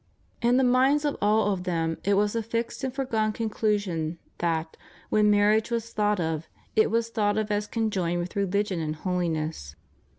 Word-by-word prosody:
In 240 +1 +3
the 265 - +4
minds 260 +4 +3
of 290 - 0
all 210 0 +3
of 180 -2 -4
them 165 -3 -1
it 200 +3 +2
was 205 +2 +1
a 230 - +1
fixed 230 +1 -3
and 260 - -1
foregone 230 -5 0
conclusion 205 -7 -1 0.2
that, 165 -1 -1 0.4
when 210 -1 +4
marriage 210 +2 +3
was 230 -1 -3
thought 210 -1 +1
of, 160 -1 -2 0.3
it 215 - +4
was 230 +1 0
thought 205 -2 +1
of 215 -1 -1
as 205 0 0
conjoined 195 -7 -1
with 175 +1 -5
re 200 -1 +1
ligion 200 -1 0
and 155 0 -2
holiness. 160 - -2
205 Hz, 185 wpm, -26 LUFS, 175-225 Hz, 0.4 s, the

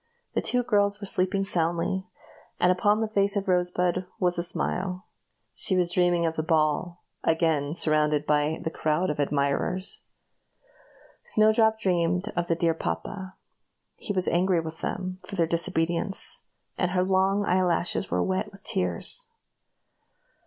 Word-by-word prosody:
The - - 0
two 250 0 +1
girls 205 -3 +1
were 205 - -6
sleeping 190 +1 +1
soundly, 175 +1 0 0.5
and 180 - +4
upon 205 +4 +2
the 220 - 0
face 200 -1 +1
of 200 0 -2
Rosebud 180 -1 +1
there 185 0 -5
was 180 -1 +2
a - - +2
smile. 180 +1 -1 0.5
She 190 - +1
was 175 -1 +1
dreaming 175 -1 +2
of 160 -1 -1
the 155 - -1
ball 160 +2 0 0.2
again 160 -2 +1
surrounded 150 -2 +2
by 150 +1 +1
a - - 0
crowd 155 +3 0
of 150 - -6
admirers. 145 +6 -1 1.2
Snowdrop 220 +1 +3
dreamed 180 0 0
of 175 0 -1
the 165 - +1
dear 165 0 +1
papa; 165 - -5 0.6
he - - -5
was 185 -2 0
angry 180 0 +2
with 160 0 -7
them 185 0 -4
for 200 - -6
their 170 -3 +2
disobedience, 170 +3 0 0.4
and 180 - +1
her 180 0 +1
long 190 +2 +2
eyelashes 180 0 0
were - - 0
wet 190 +3 -1
with 195 +1 -15
tears. 465 - +1
180 Hz, 150 wpm, -26 LUFS, 165-195 Hz, 1.2 s, and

